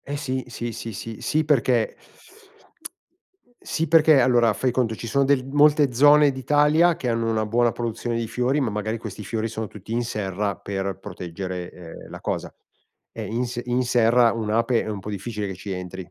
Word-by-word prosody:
Eh 145 +1 -4
sì, 130 -3 -3
sì, 120 -1 -5
sì, 115 0 -7
sì, 110 +2 -7
sì 155 +1 +1
perché 130 -6 +1 1.7
sì 165 - -2
perché 155 -2 +6
allora 120 -3 +4
fai 130 +4 0
conto 120 -3 0
ci 115 - -7
sono 140 +5 +2
de 135 -1 +2
molte 145 -2 +4
zone 145 +3 +6
d'Italia 150 +6 +3
che 125 - -3
hanno 115 0 0
una 110 -1 0
buona 120 +2 +2
produzione 120 0 -3
di 115 -1 -2
fiori, 125 +5 0
ma 125 - 0
magari 105 +2 -3
questi 105 -2 -7
fiori 110 +2 -2
sono 110 -1 -5
tutti 105 +1 -12
in 120 +1 0
serra 100 -3 -2
per 95 -1 -4
proteggere, 90 0 -6
ehm, 85 -2 -11
la - - -9
cosa. - - -3 0.6
E - - -6
in 120 +3 -2
s 120 0 -4
in 125 +1 0
serra 120 -1 +4
un'ape 115 +2 0
è - - -5
un 105 -2 -4
po' 95 - -8
difficile 105 +1 -4
che 95 - -5
ci 100 +2 -7
entri, 90 0 -6
115 Hz, 190 wpm, -23 LUFS, 105-130 Hz, 1.7 s, perché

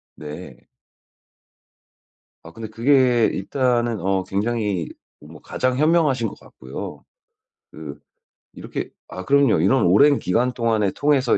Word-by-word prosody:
네. 75 0 -10 1.8
아 80 - -12
근데 110 +4 -8
그게 125 0 +3
일단은 120 +2 0
어 95 +1 0
굉장히 105 -3 -2 0.3
뭐 75 +1 -14
가장 130 0 -2
현명하신 150 -6 +2
것 - - -10
같고요. 65 +1 -9 0.7
그 75 -2 -10 0.5
이렇게 - - -6 0.2
아 95 - -8
그럼요. 140 - +3
이런 120 +7 +3
오랜 140 +11 +5
기간 125 +8 0
동안에 110 -5 0
통해서 140 -2 +2
115 Hz, 230 characters per minute, -22 LUFS, 95-130 Hz, 1.8 s, 오랜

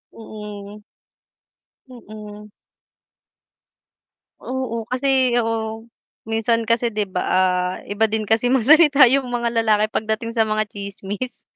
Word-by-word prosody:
Mm. 210 -2 -10 1.1
Mm. 210 -3 -11 1.9
Oo, 245 -4 -4
kasi 260 -1 +1
oo, 225 0 -3 0.4
minsan 225 +1 0
kasi 230 +1 +1
'di 210 - +1
ba, 180 -1 -2
ah, 180 0 +1
iba 215 +2 0
din 215 0 -2
kasi 225 +3 +1
magsalita 285 +3 +5
yung 270 -1 +1
mga 235 -1 -2
lalaki 215 -1 +2
pagdating 220 +1 -2
sa 225 -2 +1
mga 215 0 0
tsismis. 200 +4 -7
220 Hz, 110 wpm, -21 LUFS, 210-245 Hz, 1.9 s, magsalita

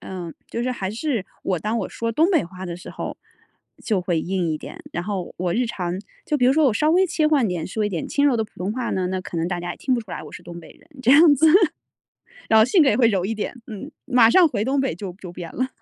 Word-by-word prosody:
嗯， 175 -3 -7
就 235 - -4
是 255 - -1
还 200 -6 -3
是 230 -1 -2 0.2
我 185 -2 0
当 215 +6 -2
我 - - -2
说 230 0 -3
东 325 - +3
北 335 - +3
话 185 +2 -9
的 175 -2 -5
时 180 - -11
候 - - -6 0.7
就 210 -5 +1
会 175 -2 0
硬 180 0 -1
一 155 - -1
点， - - -10
然 170 - -2
后 190 -2 -4
我 175 -1 -1
日 240 +4 +1
常 180 -6 -3 0.3
就 300 - 0
比 250 - +4
如 260 - +5
说 310 0 +4
我 240 - +3
稍 300 +8 +2
微 375 +2 +5
切 325 -3 +1
换 285 -8 +3
点 175 -3 -3
说 215 +3 -2
一 - - +1
点 175 -6 -3
轻 285 - +1
柔 270 -4 +4
的 220 - 0
普 - - -18
通 190 +4 -2
话 250 0 -3
呢， 185 -1 -1
那 185 0 -2
可 180 - -7
能 165 +1 0
大 180 - -2
家 175 0 -4
也 - - -11
听 260 - -1
不 245 - +2
出 210 -5 -10
来 - - -5
我 - - -10
是 - - -10
东 170 0 -9
北 160 - -14
人 - - -20
这 255 - +3
样 300 +1 +8
子。 315 +3 +4 1.0
然 220 - +5
后 220 - +7
性 320 +8 +4
格 280 - +5
也 210 - +2
会 240 - +5
柔 195 -5 +1
一 220 +3 -2
点， 230 +3 -5
嗯， 220 +8 -8
马 245 -4 +5
上 340 +8 +6
回 215 -5 -1
东 270 +1 +1
北 215 - -1
就 185 0 -6
就 180 -2 -8
变 175 -2 -8
了。 255 +1 0
220 Hz, 310 characters per minute, -22 LUFS, 180-260 Hz, 1.0 s, 样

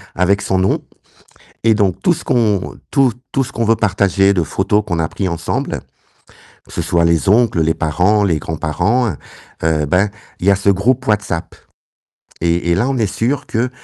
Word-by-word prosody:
avec 95 +3 +2
son 95 - 0
nom 95 +1 +1 0.8
et 115 0 +5
donc 100 -4 0
tout 180 - +4
ce - - -8
qu'on, 105 -6 0
tout 135 -4 +3 0.2
tout 135 - +2
ce - - -10
qu'on 115 - -1
veut 115 +1 +3
partager, 100 -2 +2
de 90 -4 +1
photos 105 +6 0
qu'on 85 -5 -2
a 80 - +1
pris 95 - -3
ensemble, 85 -1 -3 0.9
que - - -16
ce - - -3
soit 85 -1 +1
les 85 +3 +2
oncles, 110 -4 +3
les 80 +1 +1
parents, 90 +7 +1
les 85 -6 +1
grands-parents, 85 - 0 0.5
heu, 80 -2 +1
ben, 90 +7 +2 0.3
il 90 - -3
y - - +8
a 100 - +4
ce 100 0 +2
groupe 120 +7 +1
WhatsApp 105 -6 -1 0.9
et 85 +1 0
et - - +3
là, 110 +8 +1
on 135 - -1
est 110 -3 +1
sûrs 125 +5 -1
que, 120 +3 -1
100 Hz, 190 wpm, -17 LUFS, 85-110 Hz, 0.9 s, y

